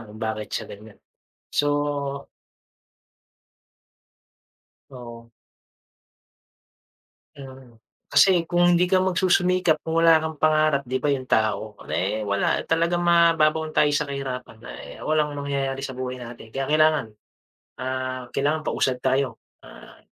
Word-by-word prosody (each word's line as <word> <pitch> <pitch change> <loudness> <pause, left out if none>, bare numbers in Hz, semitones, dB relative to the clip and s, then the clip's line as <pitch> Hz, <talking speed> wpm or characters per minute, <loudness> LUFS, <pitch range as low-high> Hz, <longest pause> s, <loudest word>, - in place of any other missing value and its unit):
'yan - - -10
kung 110 +1 -12
bakit 110 -1 -3
siya - - -2
ganiyan. 105 +1 -14 0.6
So 145 -1 -1 2.6
Oo. 120 -3 -11 2.1
Mm. 130 -4 -13 0.3
Kasi 180 -3 +5
kung 175 +1 +3
hindi 175 - +3
ka 185 +1 +2
magsusumikap 180 -2 +2
kung 160 0 -4
wala 165 -1 +6
kang 160 -1 -5
pangarap, 155 -2 +2
'di 130 +1 -3
ba, 145 - -1
'yong 135 -2 0
tao, 110 -3 -1
eh, 100 +5 -1
wala, 100 -1 0
talagang 170 +2 +1
mababaon 165 -2 +3
tayo 150 - +3
sa 145 +1 0
kahirapan. 135 -4 -6
Ah, - - -10
eh, - - -11
walang 150 -1 0
mangyayari 140 -2 -3
sa 135 -2 -6
buhay 125 0 -5
natin. 115 -2 -11
Kaya 135 0 -3
kailangan 155 -3 +3 0.7
ah, 130 -1 -4
kailangan 145 +3 +1
pausad 130 -1 0
tayo, 130 -2 0 0.2
ah, - - -15
140 Hz, 125 wpm, -24 LUFS, 125-155 Hz, 2.6 s, wala